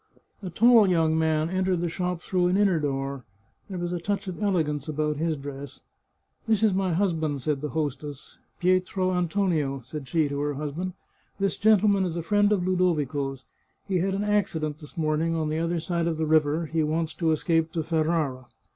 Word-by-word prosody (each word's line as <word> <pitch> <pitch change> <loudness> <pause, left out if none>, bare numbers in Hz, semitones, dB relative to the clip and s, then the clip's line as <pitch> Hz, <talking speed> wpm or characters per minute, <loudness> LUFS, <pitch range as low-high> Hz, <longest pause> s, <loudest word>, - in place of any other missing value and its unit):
A 190 - -5
tall 225 +2 +5
young 165 -3 +2
man 160 -1 +1
entered 185 -1 +1
the 175 - -1
shop 180 0 -3
through 180 -2 +1
an 180 +2 +2
inner 195 -5 +3
door; 135 -2 -3 0.5
there 190 - -5
was 175 0 -3
a 175 - -2
touch 200 +3 -2
of 185 +2 -6
elegance 160 -8 0
about 150 -1 -1
his 160 0 -1
dress. 140 0 -8 0.3
" - - -43
This 220 -1 +2
is 215 -3 +4
my 190 -2 0
husband," 160 -7 0
said 145 -1 -1
the 150 - -3
hostess. 145 -2 -5
— - - -44
" - - -43
Pietro 185 +1 +1
An 180 -1 +1
tonio," 160 -8 0
said 135 +3 -8
she 155 +2 +1
to 140 0 -3
her 145 0 -1
husband, 155 +6 -4 0.2
" - - -39
this 195 0 +1
gentleman 205 -2 +4
is 175 -3 -2
a 170 - -3
friend 205 +3 +3
of 190 -4 +1
Ludovico's. 145 -7 0 0.4
He 190 -3 +1
had 190 +2 0
an 200 - -1
accident 160 -8 0
this 150 +1 -13
morning 160 +1 0
on 155 -2 -1
the 155 +1 -1
other 170 +1 0
side 170 0 -1
of 165 -2 -1
the 160 - 0
river; 155 +1 +2
he 160 +1 -1
wants 155 +1 -1
to 165 -2 0
escape 165 +1 +1
to 165 - -1
Ferrara." 155 -5 -1
165 Hz, 210 wpm, -26 LUFS, 150-185 Hz, 0.5 s, tall